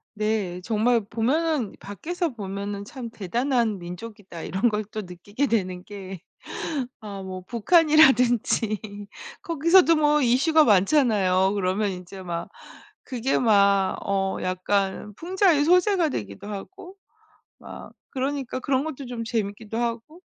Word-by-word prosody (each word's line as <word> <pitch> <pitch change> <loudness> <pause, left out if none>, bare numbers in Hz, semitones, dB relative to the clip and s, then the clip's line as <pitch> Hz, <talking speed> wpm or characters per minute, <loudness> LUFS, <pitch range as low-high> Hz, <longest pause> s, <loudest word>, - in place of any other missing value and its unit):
네. 210 -4 -1
정말 230 +2 +2
보면은 265 +1 0
밖에서 335 - -4
보면은 200 -1 -5
'참 250 -1 -7
대단한 230 +1 -1
민족이다.' 180 0 -9
이런 205 +6 +1
걸 215 0 -2
또 215 - -4
느끼게 205 +8 -3
되는 185 -6 -1
게 195 -2 -9 0.8
어 200 -2 -7
뭐 185 -1 -6
북한이라든지 245 - +3 0.6
거기서도 335 +2 +4
뭐 300 0 +3
이슈가 280 +5 +4
많잖아요. 195 -4 +3
그러면 200 +1 0
인제 185 +1 -8
막 170 -2 -5 0.5
그게 255 0 -1
막 200 -4 +3
어 195 -1 0
약간 190 +2 -1
풍자의 355 - +2
소재가 360 0 +3
되기도 100 - -6
하고 360 - -8 0.6
막 - - -11 0.2
그러니까 270 -1 -3
그런 265 +1 0
것도 290 -3 -6
좀 240 -2 -5
재밌기도 220 -1 -3
하고 240 +7 -3
220 Hz, 265 characters per minute, -24 LUFS, 195-275 Hz, 0.8 s, 거기서도